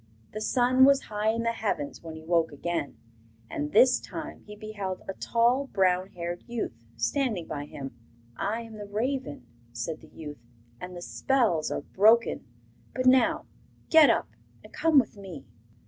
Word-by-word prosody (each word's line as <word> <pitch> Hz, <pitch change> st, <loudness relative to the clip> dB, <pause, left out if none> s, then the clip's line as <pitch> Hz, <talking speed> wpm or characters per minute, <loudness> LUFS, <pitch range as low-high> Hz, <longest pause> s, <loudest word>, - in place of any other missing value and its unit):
The 215 Hz, -, -5 dB
sun 255 Hz, +3 st, +3 dB
was 275 Hz, 0 st, +7 dB
high 210 Hz, -2 st, -2 dB
in 230 Hz, +1 st, 0 dB
the 230 Hz, -, +1 dB
heavens 200 Hz, -11 st, -3 dB
when 165 Hz, -1 st, -8 dB
he 160 Hz, -, -10 dB
woke 165 Hz, -1 st, +2 dB
again, 160 Hz, 0 st, -3 dB, 0.5 s
and 150 Hz, 0 st, -3 dB
this 250 Hz, +4 st, +6 dB
time -, -, -7 dB
he 210 Hz, -, -9 dB
beheld 205 Hz, -3 st, -5 dB
a 195 Hz, -, -3 dB
tall, 240 Hz, +7 st, +1 dB
brown 185 Hz, -4 st, +2 dB
haired 175 Hz, 0 st, -5 dB
youth 235 Hz, -, -3 dB, 0.2 s
standing 215 Hz, -, 0 dB
by 145 Hz, -1 st, -5 dB
him. 135 Hz, -2 st, -8 dB, 0.4 s
'I 210 Hz, -, -2 dB
am 225 Hz, -1 st, -10 dB
the 205 Hz, -, -7 dB
raven,' 220 Hz, -, -3 dB, 0.3 s
said 120 Hz, +7 st, -4 dB
the 160 Hz, -, -15 dB
youth, 150 Hz, -2 st, -9 dB, 0.4 s
'and 180 Hz, 0 st, -7 dB
the 175 Hz, -, -7 dB
spells 225 Hz, -, +1 dB
are -, -, -2 dB
broken. 220 Hz, -, +3 dB, 0.5 s
But 255 Hz, -, -1 dB
now 255 Hz, -1 st, +4 dB, 0.5 s
get 320 Hz, -2 st, +8 dB
up -, -, +1 dB, 0.3 s
and -, -, -15 dB
come 325 Hz, -2 st, +3 dB
with 245 Hz, -5 st, +3 dB
me. 185 Hz, -9 st, -9 dB
205 Hz, 165 wpm, -28 LUFS, 165-240 Hz, 0.5 s, get